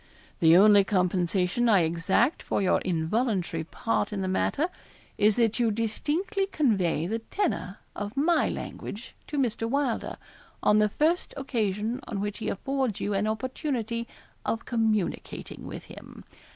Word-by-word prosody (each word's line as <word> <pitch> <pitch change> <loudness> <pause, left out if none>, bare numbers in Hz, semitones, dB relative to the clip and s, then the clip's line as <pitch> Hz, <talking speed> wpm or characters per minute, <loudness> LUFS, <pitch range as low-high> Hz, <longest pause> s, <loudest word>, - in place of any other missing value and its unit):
'The 165 +1 +7
only 205 +1 +7
compensation 185 +3 +1
I 200 -5 +6
exact 170 - +1
for - - -1
your 190 -2 +2
involuntary 180 0 0
part 225 +8 -1
in 200 -2 -3
the 190 - -1
matter 275 - +1 0.5
is 210 0 +4
that 230 -1 +2
you 235 -2 +3
distinctly 305 - -1
convey 195 - +1
the 220 +5 -2
tenor 225 - -2 0.2
of 205 +5 -5
my 330 +4 +3
language 210 +4 -6
to 295 - -4
Mr. 230 -4 0
Wylder, 275 -3 -1 0.5
on 210 - +5
the 210 0 +3
first 320 - 0
occasion 225 -3 -1
on 200 - -3
which 205 +1 -3
he 220 - -2
affords 265 0 -1
you 205 - -1
an 200 +2 +1
opportunity 235 0 -2 0.4
of 225 - -2
communicating 220 -5 -2
with - - -7
him. - - -12
215 Hz, 145 wpm, -27 LUFS, 195-255 Hz, 0.5 s, The